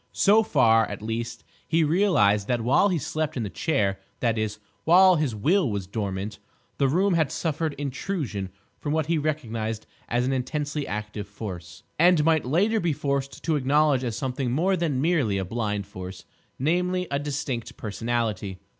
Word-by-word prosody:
So 210 +3 +5
far, 115 - +4
at 105 0 -7
least, 115 +1 -4 0.2
he 165 +1 +3
realised 145 - +3
that 120 -2 0
while 135 - +4
he 180 - +1
slept 155 +1 -2
in 120 - -1
the 100 - -4
chair—that 105 -3 -1
is, 110 -1 -2 0.3
while 185 +2 +6
his 145 -7 -1
will 160 - +2
was 100 -3 -3
dormant—the 100 +5 -4
room 185 +8 +2
had 160 -4 +2
suffered 160 -1 -1
intrusion 135 - -3 0.3
from 145 - -2
what 160 -1 +1
he 165 0 +1
recognised 115 -8 -3 0.2
as 120 +2 +1
an 135 - 0
intensely 145 +3 -2
active 105 -1 -5
Force, 95 -5 -8 0.2
and 170 -2 +5
might 160 -3 +3
later 200 - +2
be 170 -5 +1
forced 140 -1 -2
to 165 -2 +1
acknowledge 145 0 +3
as 115 -3 -2
something 130 -1 -2
more 180 +9 +2
than 160 -7 -1
merely 150 - +2
a 95 - -2
blind 105 -1 -2
force, 95 -2 -9 0.3
namely, 180 +5 +1
a 140 - +1
distinct 140 -5 -4
personality. 110 -3 -2
130 Hz, 165 wpm, -25 LUFS, 110-160 Hz, 0.3 s, while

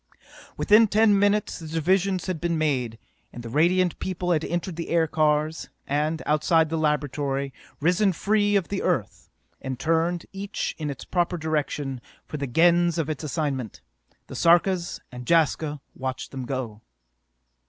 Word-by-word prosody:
Within 215 +2 +5
ten 210 -1 +4
minutes 205 +1 +1
the 160 - -8
divisions 185 +4 +1
had 185 -4 -3
been 170 -1 0
made, 130 -7 -1 0.3
and 120 - -9
the 115 - -7
Radiant 175 +5 +2
People 180 -1 -2
had 160 -2 +2
entered 175 +1 -3
the 165 0 -5
aircars 155 -1 +1 0.2
and, 150 +3 -1
outside 160 +1 +3
the 165 - -1
laboratory, 145 -2 -1 0.3
risen 180 +6 +3
free 205 +3 +1
of 195 -4 +1
the 200 - -2
Earth, - - -2 0.3
and 130 -2 -5
turned, 165 +2 0
each 195 +1 -4
in 150 -2 -3
its 135 -2 -7
proper 175 -1 0
direction, 150 -4 -2 0.2
for 150 - -6
the 140 -1 -3
Gens 170 +5 +3
of 160 -2 -1
its 155 - -6
assignment. 140 - -3 0.4
The - - -10
Sarkas 175 +1 +2
and 125 -1 -9
Jaska 155 -3 +2
watched 130 0 -5
them 130 -2 -5
go. 120 -5 -4
160 Hz, 155 wpm, -25 LUFS, 145-175 Hz, 0.4 s, Within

